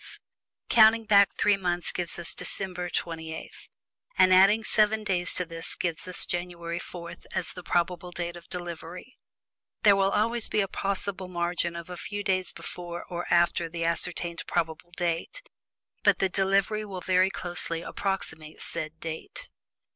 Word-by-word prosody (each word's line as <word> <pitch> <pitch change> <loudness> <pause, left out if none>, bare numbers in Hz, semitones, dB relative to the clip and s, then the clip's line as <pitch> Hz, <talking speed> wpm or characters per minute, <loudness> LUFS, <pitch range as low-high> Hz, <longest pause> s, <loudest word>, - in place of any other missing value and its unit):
Counting 225 0 +6
back 200 -2 +6
three 205 -1 +4
months 175 -2 0
gives 175 -2 -3
us 175 -1 0
December 180 -2 -1
28; 160 -2 -4 0.7
and 185 0 +6
adding 195 +4 +6
seven 215 0 +3
days 180 -3 0
to 180 - +3
this 165 -1 -3
gives 175 +2 -2
us 180 - +1
January 175 -1 -3
4, 170 -2 -8 0.2
as 175 - +1
the 180 - -8
date - - -18
of - - -12
probable 175 0 0
delivery. 175 +3 -6 0.7
There 205 -2 +7
will 195 0 +3
always 225 +3 +1
be - - +1
a 195 - 0
possible 195 -1 -2
margin 170 -1 -1
of 170 -1 -7
a 180 - -6
few 205 +2 -5
days 185 -2 +1
before 175 -1 -6
or 175 0 -4
after 170 -1 +3
the 165 0 -3
ascertained 170 0 -1
probable 165 0 -2
date 175 - -2 0.6
but - - +4
the 190 - +1
delivery 195 +3 +1
will 190 -3 -6
very 185 +1 +3
closely 175 -3 -1
approximate 160 -6 -4
said 155 +1 -4
date. 165 - -7
180 Hz, 155 wpm, -27 LUFS, 170-195 Hz, 0.7 s, There